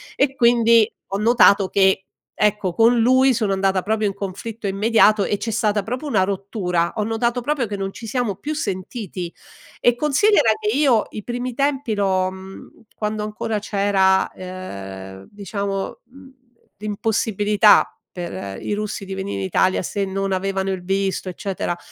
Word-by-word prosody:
e 275 Hz, -1 st, +1 dB
quindi, 235 Hz, -3 st, +5 dB, 0.3 s
ho -, -, +1 dB
notato 210 Hz, -3 st, +4 dB
che, 190 Hz, -1 st, +3 dB, 0.3 s
ecco, 210 Hz, -3 st, +1 dB
con 230 Hz, +5 st, +4 dB
lui 260 Hz, +3 st, +4 dB
sono 215 Hz, -4 st, 0 dB
andata 190 Hz, -1 st, +1 dB
proprio 215 Hz, +1 st, 0 dB
in 200 Hz, -, -2 dB
conflitto 205 Hz, +3 st, -6 dB
immediato 210 Hz, +1 st, +3 dB
e 205 Hz, -, -1 dB
c'è 225 Hz, -, -4 dB
stata 215 Hz, -2 st, 0 dB
proprio 250 Hz, +8 st, -4 dB
una 230 Hz, -9 st, +2 dB
rottura. 185 Hz, -3 st, -1 dB
Ho 210 Hz, -, +1 dB
notato 235 Hz, +3 st, -1 dB
proprio 275 Hz, -2 st, -1 dB
che 205 Hz, -1 st, -4 dB
non 195 Hz, 0 st, -4 dB
ci 225 Hz, -, -9 dB
siamo 230 Hz, -3 st, -1 dB
più 300 Hz, +9 st, -5 dB
sentiti 190 Hz, -, -5 dB, 0.5 s
e 240 Hz, -, +3 dB
considera 300 Hz, -, +3 dB
che 425 Hz, 0 st, -1 dB
io 265 Hz, -7 st, +3 dB
i 210 Hz, -, -7 dB
primi 245 Hz, +2 st, -4 dB
tempi 275 Hz, -4 st, 0 dB
l'ho, 190 Hz, -2 st, +1 dB
mhmm, 190 Hz, 0 st, -11 dB, 0.3 s
quando 210 Hz, 0 st, -3 dB
ancora 215 Hz, 0 st, -3 dB
c'era, 195 Hz, -2 st, +2 dB
ehm, 95 Hz, -, -8 dB
diciamo, 200 Hz, +1 st, -4 dB
mhmm, 270 Hz, +2 st, -16 dB, 0.5 s
l'impossibilità 210 Hz, 0 st, +2 dB, 0.2 s
per 100 Hz, -, -6 dB
i -, -, -3 dB
russi 205 Hz, -1 st, -4 dB
di 195 Hz, -, -6 dB
venire 195 Hz, +1 st, -4 dB
in -, -, -2 dB
Italia 185 Hz, 0 st, +2 dB
se 200 Hz, +3 st, -2 dB
non 195 Hz, 0 st, -2 dB
avevano 195 Hz, 0 st, -1 dB
il 185 Hz, -2 st, -4 dB
visto, 195 Hz, 0 st, -1 dB
eccetera, 180 Hz, -1 st, -3 dB
205 Hz, 160 wpm, -21 LUFS, 190-230 Hz, 0.5 s, quindi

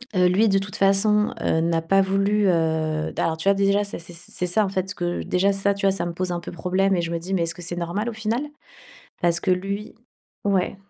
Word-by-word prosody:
heu, 180 Hz, -, +4 dB
lui, 205 Hz, +4 st, +3 dB
de 195 Hz, -, +3 dB
toute 195 Hz, +1 st, -4 dB
façon, 210 Hz, +2 st, +3 dB
heu, 160 Hz, -, +1 dB
n'a 165 Hz, 0 st, +1 dB
pas 195 Hz, +4 st, +3 dB
voulu, 195 Hz, +2 st, +1 dB
heu, 160 Hz, -2 st, 0 dB
d -, -, -7 dB
alors 160 Hz, -1 st, 0 dB
tu 195 Hz, +5 st, +1 dB
vois, -, -, +6 dB
déjà 200 Hz, +1 st, +2 dB
ça 200 Hz, -, -4 dB
c'est 170 Hz, +1 st, -8 dB
c'est 170 Hz, +1 st, -7 dB
c'est 180 Hz, -, -2 dB
ça 205 Hz, +4 st, +2 dB
en -, -, -3 dB
fait 190 Hz, 0 st, -2 dB
que 175 Hz, 0 st, -2 dB
déjà 195 Hz, +2 st, +1 dB
ça, 200 Hz, +1 st, +1 dB
tu 200 Hz, -, -2 dB
vois, 195 Hz, -, +5 dB
ça 190 Hz, -2 st, -2 dB
me 170 Hz, -, -4 dB
pose 180 Hz, +1 st, -2 dB
un 175 Hz, -, -2 dB
peu -, -, -8 dB
problème 185 Hz, +3 st, +1 dB
et 175 Hz, -, 0 dB
je 170 Hz, 0 st, -3 dB
me 170 Hz, -, -1 dB
dis: 185 Hz, +3 st, -5 dB
«Mais 170 Hz, -, +1 dB
est-ce 165 Hz, 0 st, -1 dB
que 175 Hz, -, -10 dB
c'est 175 Hz, +1 st, -4 dB
normal, 175 Hz, +7 st, -2 dB
au -, -, -6 dB
final?» 220 Hz, +3 st, -2 dB, 0.8 s
Parce 170 Hz, 0 st, +2 dB
que 190 Hz, -, 0 dB
lui 200 Hz, +3 st, -3 dB, 0.5 s
ouais. 195 Hz, -2 st, +1 dB
185 Hz, 265 wpm, -23 LUFS, 170-200 Hz, 0.8 s, vois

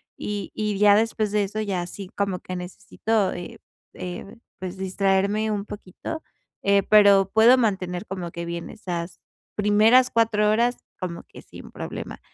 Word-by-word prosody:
y 205 Hz, -1 st, -5 dB
y 210 Hz, -2 st, -1 dB
ya 205 Hz, 0 st, +6 dB
después 220 Hz, -1 st, +1 dB
de 210 Hz, -1 st, +3 dB
eso 210 Hz, +2 st, -4 dB
ya 195 Hz, -4 st, -1 dB
así 185 Hz, +2 st, -7 dB
como 200 Hz, -2 st, -1 dB
que 185 Hz, -, -7 dB
necesito, 195 Hz, +3 st, -2 dB
eh 175 Hz, -, -8 dB, 0.4 s
eh, 180 Hz, +4 st, -7 dB, 0.2 s
pues, 185 Hz, 0 st, -6 dB
distraerme 195 Hz, +3 st, +1 dB
un 205 Hz, -1 st, -2 dB
poquito, 210 Hz, -, -7 dB, 0.4 s
eh, 200 Hz, 0 st, +4 dB
pero 200 Hz, -2 st, +6 dB
puedo 230 Hz, +4 st, +6 dB
mantener 190 Hz, -5 st, -1 dB
como 180 Hz, -3 st, -5 dB
que 170 Hz, 0 st, -5 dB
bien 170 Hz, 0 st, -5 dB
esas 175 Hz, -5 st, -5 dB, 0.4 s
primeras 215 Hz, +5 st, +5 dB
4 215 Hz, -2 st, +2 dB
horas 235 Hz, +3 st, +2 dB, 0.2 s
como 170 Hz, -2 st, -5 dB
que -, -, -13 dB
sin -, -, -12 dB
problema. -, -, -7 dB
200 Hz, 155 wpm, -24 LUFS, 185-215 Hz, 0.4 s, ya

